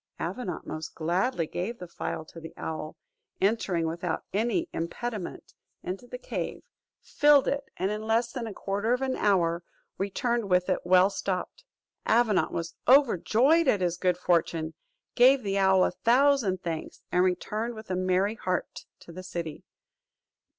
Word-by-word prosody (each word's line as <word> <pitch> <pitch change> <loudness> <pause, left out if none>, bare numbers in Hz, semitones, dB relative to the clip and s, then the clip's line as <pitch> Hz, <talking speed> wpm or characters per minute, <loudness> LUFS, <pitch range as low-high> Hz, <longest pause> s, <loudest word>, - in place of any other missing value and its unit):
Avenant 180 0 -4
most 155 0 -6
gladly 175 +4 0
gave 195 +9 -4
the 180 - -8
phial, 165 -1 -5
and 165 - -10
the 165 - -9
owl, 155 -1 -5 0.4
entering 190 -5 +1
without 165 +1 -3
any 240 - 0
impediment 190 +4 -5 0.3
into 190 +7 -5
the 250 - -7
cave, - - -5 0.4
filled 295 -2 +4
it, 280 0 -1
and 190 +3 0
in 210 0 -3
less 225 +2 +1
than 240 -3 -4
a 215 - -6
quarter 205 +4 -1
of 250 +2 0
an 260 -1 0
hour 175 -4 +2 0.4
returned 225 +3 -1
with 180 0 +2
it - - +2
well 185 +2 +5
stopped. 195 - -4 0.4
Avenant 225 -3 +3
was 170 0 -4
overjoyed 270 - +4
at 205 -7 +3
his 175 -1 +1
good 180 0 +1
fortune, 165 -2 0 0.4
gave 255 +1 +5
the 200 -1 0
owl 190 -1 +5
a - - 0
thousand 240 -6 +2
thanks, 170 +1 -5
and 180 - +3
returned 210 +6 -1
with 220 -3 -9
a - - 0
merry 185 +3 +1
heart 185 -5 -3 0.2
to - - -12
the 185 +2 -8
city. 170 -4 -6
195 Hz, 155 wpm, -28 LUFS, 175-235 Hz, 0.4 s, well